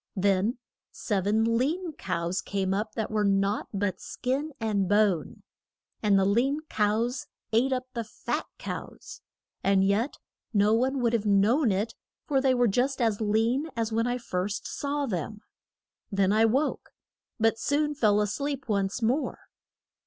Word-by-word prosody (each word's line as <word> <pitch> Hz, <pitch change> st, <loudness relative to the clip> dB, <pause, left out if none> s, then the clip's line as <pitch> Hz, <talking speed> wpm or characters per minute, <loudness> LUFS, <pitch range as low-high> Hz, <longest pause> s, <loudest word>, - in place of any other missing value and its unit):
Then 200 Hz, +4 st, +2 dB, 0.3 s
sev 200 Hz, -3 st, -2 dB
en 220 Hz, +2 st, +3 dB, 0.2 s
lean 325 Hz, +6 st, -1 dB
cows 170 Hz, -8 st, -2 dB
came 195 Hz, -1 st, -1 dB
up 210 Hz, +2 st, -2 dB
that 220 Hz, -2 st, -2 dB
were 215 Hz, -1 st, +1 dB
naught 200 Hz, +1 st, +1 dB
but 195 Hz, -2 st, -1 dB
skin 275 Hz, +5 st, -2 dB
and 205 Hz, -4 st, 0 dB
bone. 205 Hz, -5 st, +1 dB, 0.6 s
And 205 Hz, -2 st, +4 dB
the 190 Hz, -, +3 dB
lean 255 Hz, +9 st, +2 dB
cows 230 Hz, +7 st, 0 dB, 0.3 s
ate 250 Hz, +4 st, +3 dB
up 255 Hz, -1 st, -1 dB
the 235 Hz, -, -2 dB
fat 215 Hz, -, -4 dB
cows. -, -, -7 dB, 0.4 s
And 195 Hz, 0 st, +3 dB
yet 210 Hz, +8 st, +1 dB, 0.4 s
no 205 Hz, +1 st, +4 dB
one 260 Hz, +3 st, +1 dB
would 235 Hz, -1 st, +2 dB
have 220 Hz, -2 st, 0 dB
known 215 Hz, +6 st, +4 dB
it, 205 Hz, +4 st, -1 dB, 0.3 s
for 275 Hz, -3 st, +1 dB
they 265 Hz, -1 st, +3 dB
were 245 Hz, -1 st, +3 dB
just 255 Hz, +6 st, +1 dB
as 225 Hz, -3 st, +1 dB
lean 225 Hz, +7 st, +1 dB
as 225 Hz, -1 st, -1 dB
when 230 Hz, +2 st, +1 dB
I 245 Hz, 0 st, 0 dB
first 200 Hz, -3 st, -3 dB
saw 285 Hz, 0 st, -2 dB
them. 210 Hz, -, -4 dB, 0.7 s
Then 195 Hz, -1 st, +2 dB
I 220 Hz, +1 st, +5 dB
woke, 265 Hz, +7 st, 0 dB, 0.5 s
but 225 Hz, 0 st, +2 dB
soon 295 Hz, +1 st, +1 dB
fell 210 Hz, -7 st, +3 dB
a -, -, +2 dB
sleep 275 Hz, +4 st, -3 dB
once 200 Hz, +2 st, -1 dB
more. 255 Hz, +7 st, 0 dB
220 Hz, 160 wpm, -27 LUFS, 200-255 Hz, 0.7 s, I